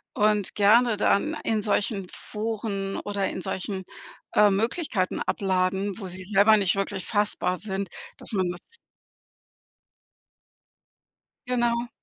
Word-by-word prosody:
und 210 -4 +1
gerne 220 +2 +5
dann 255 +9 +2
in 220 -1 0
solchen 205 -2 0
Foren 210 -2 -4
oder 200 -2 -2
in - - -5
solchen, 190 +1 -4 0.5
äh, 210 0 +6
Möglichkeiten 210 - 0
abladen, 190 +1 0
wo 195 - -5
sie 185 +1 -4
selber 205 +3 +5
nicht 195 -3 +2
wirklich 195 -2 -3
fassbar 205 -3 0
sind, 195 +1 -4 0.3
dass - - -5
man 190 -4 +1
das 175 - -8 2.7
Genau. 240 -1 +1
200 Hz, 115 wpm, -26 LUFS, 190-215 Hz, 2.7 s, äh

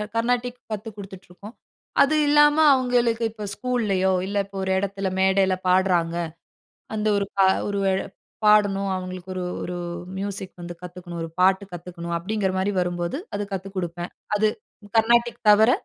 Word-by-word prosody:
கர்நாடிக் 245 +1 0
கத்துக் 215 0 -5
குடுத்துட்ருக்கோம். 195 +1 -11 0.5
அது 280 +2 +4
இல்லாம 295 0 +6 0.2
அவங்களுக்கு 245 -3 +1
இப்ப 215 -1 -8
ஸ்கூல்லயோ, 210 -7 0
இல்ல, 200 +1 -3
இப்ப 195 0 -16
ஒரு 190 - -1
இடத்தில, 195 0 -2
மேடைல 190 0 +3
பாடுறாங்க 180 -2 +2 0.8
அந்த 215 0 -1
ஒரு 200 - 0 0.6
ஒரு 190 - +2 0.5
பாடணும், 205 -2 +4
அவங்களுக்கு 185 0 -6
ஒரு 185 - -3 0.2
ஒரு 180 - -4 0.4
மியூசிக் 195 -1 -4
வந்து 175 0 -6
கத்துக்கணும், 175 -1 -8
ஒரு 165 - -5
பாட்டு 190 +2 +4
கத்துக்கணும் 170 0 -5
அப்படீங்கிற 195 +2 -1
மாரி 190 +2 +1
வரும்போது, 175 +4 -2 0.2
அது 205 - -2
கத்துக் 195 +1 -5
குடுப்பேன். 175 -1 -4 0.2
அது 215 +1 +3 0.5
கர்நாடிக் 235 +2 +3
தவிர 215 +3 +7
195 Hz, 135 wpm, -24 LUFS, 180-220 Hz, 0.8 s, தவிர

